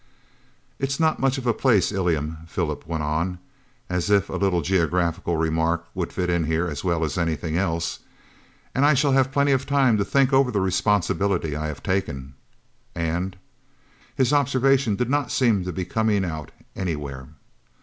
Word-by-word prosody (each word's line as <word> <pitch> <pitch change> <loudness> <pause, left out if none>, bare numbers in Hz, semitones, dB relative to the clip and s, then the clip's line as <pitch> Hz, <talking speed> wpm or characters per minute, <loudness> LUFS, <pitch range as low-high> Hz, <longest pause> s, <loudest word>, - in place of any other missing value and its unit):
"It's 140 +2 -1
not 160 -1 +2
much 135 0 +1
of 130 - -5
a 120 - +3
place, 110 -6 +2
Ilium," 80 -5 -1
Philip 80 - -3
went 80 -2 -2
on, 80 +5 -1 0.5
as 90 +2 -1
if 100 -3 +3
a - - -4
little 90 -4 +1
geographical 85 -1 0
remark 80 +1 0
would 90 -3 -3
fit 90 -1 -2
in 85 -2 +1
here 80 +2 0
as 75 -4 -5
well 85 -3 0
as 75 +3 -3
anything 80 -1 -1
else, 85 -2 -1 0.7
"and 135 - +1
I 145 0 +5
shall 140 +1 +2
have 135 0 +3
plenty 140 +1 +2
of 135 0 +1
time 135 -6 +3
to - - +2
think 135 +5 +2
over 135 -1 +4
the 105 -4 0
responsibility 95 -3 +1
I 75 +1 -3
have 75 -2 -7
taken, 70 -9 -2 0.6
and 85 +3 -2 0.4
" - - -32
his 130 +1 +2
observation 135 -4 +3
did 120 +4 -1
not 145 +2 0
seem 110 -8 +2
to 90 - -3
be 90 +1 -4
coming 105 0 +1
out 80 -3 -5 0.3
any 90 -4 -2
where. 70 -3 -7
95 Hz, 180 wpm, -24 LUFS, 80-125 Hz, 0.7 s, I